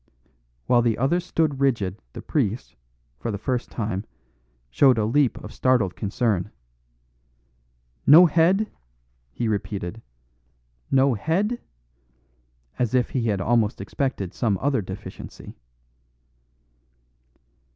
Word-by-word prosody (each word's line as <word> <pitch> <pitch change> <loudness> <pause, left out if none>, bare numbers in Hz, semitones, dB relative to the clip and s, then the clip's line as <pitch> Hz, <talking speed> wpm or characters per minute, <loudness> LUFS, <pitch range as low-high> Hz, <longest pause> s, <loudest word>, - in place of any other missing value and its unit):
While 120 -1 +4
the 115 -2 +1
others 155 +8 +1
stood 155 -5 0
rigid 115 -9 0
the - - -8
priest, 120 -5 -2 0.4
for 115 - -4
the 105 - -2
first 125 +4 -2
time, 105 -4 -3 0.7
showed 130 - +5
a 110 - +1
leap 130 +3 +2
of - - -9
startled 125 -8 +1
concern. 105 -2 -1 1.6
"No 165 +5 +10
head!" 175 +6 +3 0.6
he 120 - -2
repeated. 105 -1 -3 0.9
"No 135 0 +4
head?" 190 - -1 1.2
as 125 0 +1
if 125 -1 +1
he 120 -3 -1
had 100 -3 0
almost 110 0 +1
expected 100 -2 -3
some 105 -5 0
other 135 -4 +1
deficiency. 95 0 -9
120 Hz, 110 wpm, -24 LUFS, 105-140 Hz, 1.6 s, No